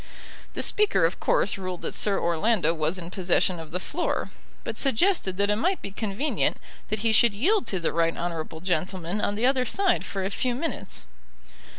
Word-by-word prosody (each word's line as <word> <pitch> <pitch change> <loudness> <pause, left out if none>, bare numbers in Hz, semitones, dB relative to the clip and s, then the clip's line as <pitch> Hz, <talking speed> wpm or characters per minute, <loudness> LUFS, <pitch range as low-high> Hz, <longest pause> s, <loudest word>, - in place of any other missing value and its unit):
The - - -2
Speaker 405 - +3
of 165 - -1
course 195 - +1
ruled 185 -2 -5
that - - -3
Sir 200 -2 +1
Orlando 170 +2 +2
was 160 +2 -1
in 175 -1 -7
possession 185 -1 +1
of 160 -1 -8
the 180 - -3
floor, 335 - -2 0.3
but - - -4
suggested 270 - +1
that 200 +1 +2
it 210 - +1
might 365 - +1
be 200 - -7
convenient 215 +8 -1 0.3
that 215 -1 -2
he 225 - +4
should 220 -1 +5
yield 385 - +2
to 190 - 0
the 165 - -1
right 165 0 +1
honourable 165 -2 -4
gentleman 180 +2 -1
on 205 - 0
the 225 +4 0
other 260 -1 +3
side 380 - +1
for 195 -1 -3
a 195 - -2
few 245 +4 -1
minutes. 320 +6 -4
195 Hz, 195 wpm, -26 LUFS, 175-240 Hz, 0.3 s, should